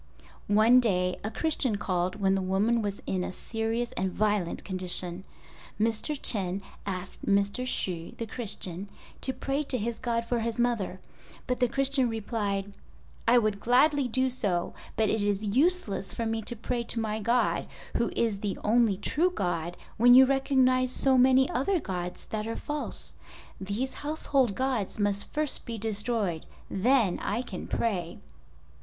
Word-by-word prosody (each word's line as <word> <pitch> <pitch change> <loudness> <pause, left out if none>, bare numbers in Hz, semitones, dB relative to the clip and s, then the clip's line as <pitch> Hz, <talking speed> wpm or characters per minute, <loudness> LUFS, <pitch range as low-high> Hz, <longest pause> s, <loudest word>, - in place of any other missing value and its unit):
One 220 +5 +6
day 180 -6 +1
a 215 - -1
Christian 270 -4 0
called 185 -3 -1
when 195 -2 +2
the 195 - +1
woman 200 +5 +1
was 200 -1 -4
in 185 -1 -1
a - - -3
serious 225 +4 -2
and 190 0 -1
violent 205 -3 0
condition. 185 -1 -2 0.5
Mr. 230 +7 0
Chen 195 -5 0 0.2
asked 185 -1 -5
Mr. 200 +5 +1
Hsu, 175 -8 -2
the 230 - -3
Christian, 200 -4 -5 0.3
to 265 - 0
pray 270 +2 -2
to 260 - -1
his 230 +1 -3
God 235 -2 -1
for 240 0 0
his 230 0 -2
mother, 235 -6 0 0.5
but 250 -1 -1
the 250 - +4
Christian 270 0 +1
replied, 205 -3 -2 0.5
"I 240 +2 +6
would 215 -3 +1
gladly 270 +4 +3
do 260 +2 +1
so, 195 -8 -1 0.2
but 220 - +2
it 220 - 0
is 205 0 0
useless 235 - +1
for 230 - -2
me 225 0 -1
to 240 - -2
pray 235 +2 -2
to 230 - +1
my 220 -1 -1
God, 235 +4 +1 0.3
who 235 - +1
is 220 -4 +1
the 200 -1 -2
only 220 -2 +3
true 320 - +1
God, 175 - -2 0.2
when 245 +2 +7
you 265 +1 +9
recognize 260 -1 +3
so 265 +1 +3
many 260 +1 +5
other 340 +9 +1
gods 180 - -5
that 215 0 -4
are 230 - -3
false. 295 0 -4 0.5
These 205 +8 -3
household 275 -7 0
gods 255 -7 -1
must 205 -1 0
first 300 -1 0
be 230 -1 -4
destroyed: 210 -5 -1 0.2
then 225 -1 +2
I 230 +5 -2
can 195 -7 -7
pray." 185 -7 -1
225 Hz, 160 wpm, -28 LUFS, 195-250 Hz, 0.5 s, you